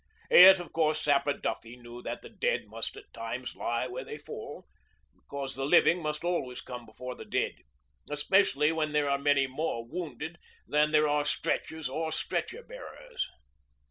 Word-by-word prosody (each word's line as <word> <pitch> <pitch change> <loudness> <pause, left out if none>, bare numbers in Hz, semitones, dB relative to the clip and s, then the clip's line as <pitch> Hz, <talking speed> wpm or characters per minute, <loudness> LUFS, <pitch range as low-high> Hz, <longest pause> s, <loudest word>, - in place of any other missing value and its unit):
Yet 190 +1 +10
of 175 -3 -8
course 155 -1 +2
Sapper 145 -1 +2
Duffy 115 -3 -4
knew 120 0 -10
that - - -5
the - - -10
dead 485 0 0
must - - -4
at 420 -1 -14
times 120 +2 -5
lie 120 +1 -1
where 130 +1 -5
they 145 - -7
fall, 145 - -8 0.5
because 140 -1 -6
the 135 - -3
living 170 +4 +5
must 150 0 -3
always 170 -8 -1
come 125 -2 -8
before 125 +3 -7
the - - -9
dead, - - -1 0.5
especially 150 0 +3
while 160 -1 0
there 150 -1 +2
are 140 0 +1
many 140 -1 +3
more 130 -3 -3
wounded 160 +2 -6 0.3
than 150 +1 +3
there 155 0 +4
are 145 0 +2
stretchers 160 +1 -1
or 160 +4 -2
stretcher 475 - -2
bearers. - - -6
150 Hz, 170 wpm, -30 LUFS, 130-160 Hz, 0.5 s, Yet